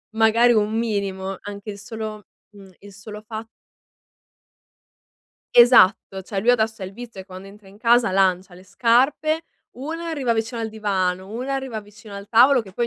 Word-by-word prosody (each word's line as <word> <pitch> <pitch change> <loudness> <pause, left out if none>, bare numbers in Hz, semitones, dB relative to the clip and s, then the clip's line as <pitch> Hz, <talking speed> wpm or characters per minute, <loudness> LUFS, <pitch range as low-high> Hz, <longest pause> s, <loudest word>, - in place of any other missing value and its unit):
magari 230 +2 +4
un 210 -1 +1
minimo, 195 -4 -3
anche 205 +1 -8
il 200 - -10
solo 215 -2 -7 0.3
mhmm, 195 -2 -15
il 200 -1 -14
solo 210 +1 -10
fat 220 0 -7 2.1
Esatto, 195 -5 +5
cioè 195 0 -4
lui 230 - -4
adesso 220 -2 0
ha 190 - -4
il 190 - -10
vizio 230 -5 -9
quando 190 0 -11
entra 200 0 -16
in 200 - -17
casa 235 -1 +3
lancia 185 -1 +1
le 180 - -15
scarpe, 270 - +1 0.3
una 320 +6 -6
arriva 275 -7 -1
vicino 225 +1 -3
al 220 - -4
divano, 190 -3 -2
una 250 +5 -4
arriva 265 -5 -4
vicino 205 0 -14
al 200 0 -8
tavolo 245 +3 +5
che 190 -3 -14
poi 235 +4 -1
215 Hz, 170 wpm, -22 LUFS, 195-235 Hz, 2.1 s, Esatto